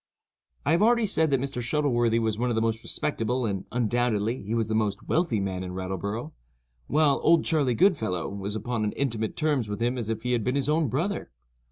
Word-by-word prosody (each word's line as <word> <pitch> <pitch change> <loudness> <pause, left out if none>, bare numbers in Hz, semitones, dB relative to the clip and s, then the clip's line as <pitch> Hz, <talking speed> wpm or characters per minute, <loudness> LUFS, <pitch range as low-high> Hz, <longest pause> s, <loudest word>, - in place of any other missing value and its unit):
I 145 - +2
have 170 +3 +3
already 235 +1 +4
said 160 -6 +2
that 135 -2 +2
Mr. 135 -1 -3
Shuttleworthy 120 -3 +1
was 110 -2 0
one 125 +1 +1
of 120 - 0
the 110 - +1
most 115 0 0
respectable 125 0 -1
and, 100 -3 -2
undoubtedly, 120 -1 0
he 105 +4 -3
was 115 -2 0
the 110 - -2
most 110 -1 -1
wealthy 160 - +1
man 95 -2 -2
in 90 0 -6
Rattleborough, 100 - -4 0.6
while 150 -1 +3
"Old 165 0 +4
Charley 145 -7 +2
Goodfellow" 110 - +2
was 100 +1 -4
upon 115 0 -2
as 105 - -2
intimate 115 -6 -2
terms 145 -8 0
with 105 - -4
him 120 +2 0
as 110 -2 -4
if 110 0 -3
he 125 - -1
had 120 -3 +1
been 125 +4 0
his 140 0 0
own 155 0 +2
brother. 165 - -2
120 Hz, 215 wpm, -26 LUFS, 110-145 Hz, 0.6 s, already